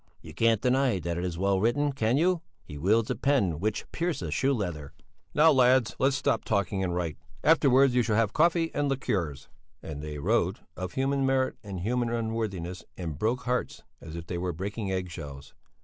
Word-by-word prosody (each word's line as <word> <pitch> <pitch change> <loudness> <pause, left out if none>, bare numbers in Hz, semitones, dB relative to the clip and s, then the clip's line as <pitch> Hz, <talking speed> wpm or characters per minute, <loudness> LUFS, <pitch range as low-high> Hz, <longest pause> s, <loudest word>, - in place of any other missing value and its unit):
"You - - -12
can't 115 -2 +2
deny 130 -3 +2
that 85 -1 -3
it - - -3
is 90 -2 -3
well 95 +1 +2
written. 140 +8 +2
Can 120 -1 +1
you? 175 +2 +2 0.2
He 75 - -10
wields 105 +9 +2
a - - 0
pen 100 - +1
which 105 +3 -1
pierces 165 - -2
shoe 135 - +2
leather." 90 - -3 0.4
"Now, 160 +2 +6
lads, 130 -3 +4
stop 130 -4 0
talking 100 -2 0
and 90 -2 -1
write; 85 -3 -2 0.3
afterwards 140 -4 +5
you 125 - +4
shall 110 -2 0
have 110 -2 +2
coffee 165 0 +2
and 145 -1 0
liqueurs." 95 - -2 0.4
And 75 -2 -6
they 75 -1 -6
wrote 70 - 0
of 90 0 -5
human 135 +1 0
merit 130 -1 +1
and 100 -4 -6
human 120 +4 0
unworthiness 110 -6 -3
and 80 -5 -5
broke 120 +3 0
hearts 125 0 -2 0.2
as 80 0 -9
if 85 -1 -6
they 85 0 -4
were 90 0 -2
breaking 100 +4 -4
egg 90 -1 -2
shells. 70 -3 -9
110 Hz, 190 wpm, -28 LUFS, 90-130 Hz, 0.4 s, Now